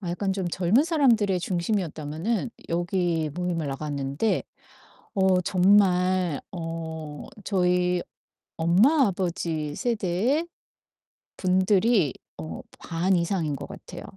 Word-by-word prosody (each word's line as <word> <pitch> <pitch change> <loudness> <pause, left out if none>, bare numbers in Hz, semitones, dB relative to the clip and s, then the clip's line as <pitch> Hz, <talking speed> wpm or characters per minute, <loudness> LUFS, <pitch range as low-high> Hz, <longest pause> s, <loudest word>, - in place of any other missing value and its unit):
아 180 -4 -4
약간 195 +2 -1
좀 190 -2 -2
젊은 185 - +3
사람들이 240 - +3
중심이었다면은 175 - -2 0.2
여기 175 -2 0
모임을 175 -4 -2
나갔는데 140 +6 -1 0.7
어 190 -2 +3
정말 185 -3 +3
어 160 -4 -6 0.2
저희 180 -2 +1 0.6
엄마, 215 - +4
아버지 165 -5 -2
세대의 235 - 0 0.9
분들이 185 - +3 0.2
어 80 0 -6 0.2
반 175 +3 0
이상인 170 -4 0
것 - - -7
같아요. - - -9
180 Hz, 220 characters per minute, -26 LUFS, 165-200 Hz, 0.9 s, 엄마